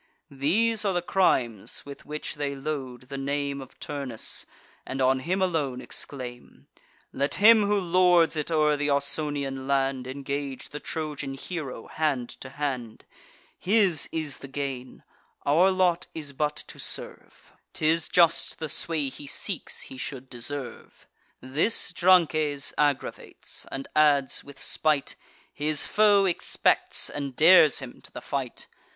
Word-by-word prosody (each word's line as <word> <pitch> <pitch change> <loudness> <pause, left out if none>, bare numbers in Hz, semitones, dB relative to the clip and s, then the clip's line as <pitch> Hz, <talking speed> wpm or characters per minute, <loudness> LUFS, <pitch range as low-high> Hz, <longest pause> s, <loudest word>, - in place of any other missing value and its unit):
These 210 +12 +1
are 200 -2 +1
the 175 - +1
crimes 125 - 0
with 140 0 -11
which 150 0 -4
they 145 -2 -3
load 135 -3 -5
the 135 +2 -7
name 140 0 -2
Of 130 - -13
Turnus, 140 -6 -4 0.4
and 135 - -5
on 130 0 +3
him 185 +7 0
alone 150 -8 -1
exclaim: 125 -2 -7 0.5
"Let 140 +1 0
him 215 0 +6
who 205 0 +2
lords 180 -2 +4
it 150 0 -2
o'er 155 -2 +3
th' 145 +1 0
Ausonian 140 -1 -1
land 135 -2 0
Engage 140 0 -5
the 150 - -7
Trojan 150 -4 -4
hero 135 -5 -6
hand 140 -6 -1
to 130 - -8
hand: 130 -5 -4 0.5
His 195 -5 +2
is 155 -4 -3
the 135 - -9
gain; 135 -2 -5 0.4
our 165 +7 +5
lot 185 -2 +1
is 150 -3 -5
but 150 +2 -1
to - - -12
serve; - - -6 0.2
'Tis 160 +1 +1
just, 170 -1 +3
the 160 -1 -4
sway 155 -1 0
he 140 - -9
seeks, - - -1
he 130 - -7
should 130 -1 -6
deserve." 130 +2 -7 0.4
This 155 - +1
Drances 155 -6 +3
aggravates; 145 -2 -2
and 135 0 -5
adds, 145 -3 +3
with 140 -1 -12
spite: 150 0 +1 0.4
"His 150 0 +3
foe 205 -2 +4
expects, 180 -3 +1
and 140 -3 -5
dares 160 -1 +7
him 130 -2 -4
to - - -11
the - - -7
fight." 135 -4 -4
145 Hz, 140 wpm, -26 LUFS, 135-165 Hz, 0.5 s, dares